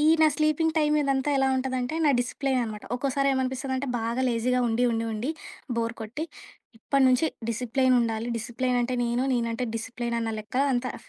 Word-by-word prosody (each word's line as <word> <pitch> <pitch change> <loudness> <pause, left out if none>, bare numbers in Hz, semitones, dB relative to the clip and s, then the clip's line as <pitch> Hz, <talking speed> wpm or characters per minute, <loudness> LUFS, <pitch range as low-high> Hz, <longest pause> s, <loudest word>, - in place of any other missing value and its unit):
ఈ - - +2 0.2
నా 315 - +7
sleeping 310 +1 +1
time 300 -1 +3
ఇదంతా 275 0 +1
ఎలా 270 0 +3
ఉంటదంటే 260 +1 -2
నా 290 - +5
డిసిప్లెయన్ 260 +1 -1
అనమాట. 215 -2 -7
ఒక్కోసారి 275 +2 0
ఏమనిపిస్తదంటే, 260 +1 -1
బాగా 235 +3 -1
లేజీగా 250 +2 +1
ఉండి, 230 +2 +1
ఉండి, 225 0 -1
ఉండి 235 +8 -2 0.5
బోర్ 230 0 -1
కొట్టి, 235 +9 -5 0.5
ఇప్ప‌డి 275 +3 +2
నుంచి 255 +5 +3 0.2
డిసిప్లెయన్ 255 +2 +2
ఉండాలి. 230 0 -1
డిసిప్లెయన్ 245 +2 -1
అంటే 250 +1 -1
నేను, 240 +2 0
నేనంటే 235 0 -1
డిసిప్లెయన్ 235 0 -3
అన్న 225 -1 -2
లెక్కల 250 +6 0
అంత 245 - 0 0.2
ఫ్ - - -22
250 Hz, 175 wpm, -26 LUFS, 230-270 Hz, 0.5 s, నా